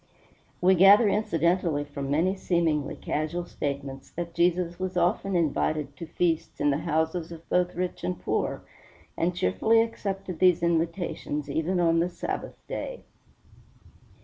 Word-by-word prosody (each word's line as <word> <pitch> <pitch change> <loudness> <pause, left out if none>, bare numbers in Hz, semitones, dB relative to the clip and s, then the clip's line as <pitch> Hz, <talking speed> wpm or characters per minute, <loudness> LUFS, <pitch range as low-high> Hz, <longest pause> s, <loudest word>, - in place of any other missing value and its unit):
We 185 +1 +6
gather 195 +5 +7
incidentally 170 -6 +1
from 140 -1 -6
many 170 +7 +2
seemingly 165 -6 0
casual 155 +3 -3
statements 140 -3 -5
that 170 0 -6
Jesus 175 0 +1
was 185 -1 -3
often 185 +2 +1
invited 150 -3 0
to 170 - -7
feasts 165 0 -1
in 145 - +3
the 140 - 0
houses 160 +1 -1
of 165 0 -11
both 180 0 +1
rich 180 +1 -3
and 90 0 -2
poor, 90 - -2 0.5
and 175 +1 0
cheerfully 175 - +3
accepted 195 -6 -5
these 180 -2 +4
invitations 165 -3 -1
even 165 +5 0
on 165 -1 +3
the 175 +2 +1
Sabbath 175 - -5
day. - - -5
170 Hz, 140 wpm, -27 LUFS, 155-180 Hz, 0.5 s, gather